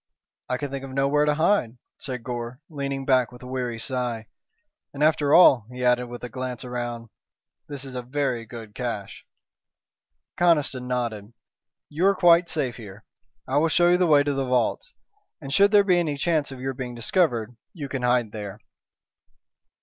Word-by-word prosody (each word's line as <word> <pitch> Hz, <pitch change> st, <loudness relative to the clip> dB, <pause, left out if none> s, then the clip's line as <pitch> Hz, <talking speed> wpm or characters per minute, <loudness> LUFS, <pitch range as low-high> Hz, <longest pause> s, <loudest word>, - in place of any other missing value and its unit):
"I 125 Hz, -, 0 dB
could 140 Hz, +1 st, -5 dB
think 135 Hz, -1 st, -5 dB
of 135 Hz, -, -7 dB
nowhere 140 Hz, +3 st, +2 dB
to 150 Hz, 0 st, +2 dB
hide," 155 Hz, -, +1 dB, 0.2 s
said 125 Hz, -3 st, -6 dB
Gore, 120 Hz, 0 st, -5 dB
leaning 140 Hz, -2 st, -4 dB
back 130 Hz, -2 st, +3 dB
with 125 Hz, +1 st, -13 dB
a -, -, -8 dB
weary 125 Hz, -2 st, -3 dB
sigh. 120 Hz, -2 st, -3 dB, 0.7 s
"And 145 Hz, -, -1 dB
after 150 Hz, -2 st, +3 dB
all," 135 Hz, -, +6 dB
he 125 Hz, 0 st, -4 dB
added, 125 Hz, 0 st, +3 dB
with 120 Hz, 0 st, -9 dB
a -, -, -3 dB
glance 125 Hz, 0 st, -5 dB
round, 120 Hz, -2 st, -5 dB, 0.6 s
"this 140 Hz, -2 st, -6 dB
is 135 Hz, -, -8 dB
a 125 Hz, -, -4 dB
very 130 Hz, -2 st, -2 dB
good 110 Hz, -2 st, -10 dB
caché." 115 Hz, -6 st, -5 dB, 1.2 s
Conniston 150 Hz, -7 st, +2 dB
nodded. 115 Hz, -4 st, -3 dB, 0.5 s
"You 165 Hz, +6 st, +1 dB
are 200 Hz, -, +4 dB
quite 175 Hz, -1 st, +5 dB
safe 135 Hz, -6 st, -2 dB
here. 105 Hz, -2 st, -11 dB, 0.4 s
I 135 Hz, +2 st, +2 dB
will 165 Hz, +2 st, +2 dB
show 175 Hz, +1 st, +4 dB
you 180 Hz, -, +5 dB
the 180 Hz, -1 st, +2 dB
way 145 Hz, -2 st, +5 dB
to 145 Hz, 0 st, -1 dB
the 135 Hz, -1 st, -2 dB
vaults, 125 Hz, -, 0 dB, 0.5 s
and 140 Hz, -2 st, -6 dB
should 200 Hz, +6 st, +5 dB
there 205 Hz, -1 st, +5 dB
be 180 Hz, -3 st, +3 dB
any 155 Hz, -4 st, -1 dB
chance 155 Hz, -1 st, 0 dB
of 135 Hz, -, -9 dB
your 135 Hz, +1 st, -3 dB
being 125 Hz, -1 st, -6 dB
discovered 120 Hz, -, 0 dB, 0.2 s
you 155 Hz, -9 st, -7 dB
can 135 Hz, -1 st, -4 dB
hide 120 Hz, -3 st, +1 dB
there." 105 Hz, -2 st, -7 dB
130 Hz, 180 wpm, -24 LUFS, 120-150 Hz, 1.2 s, all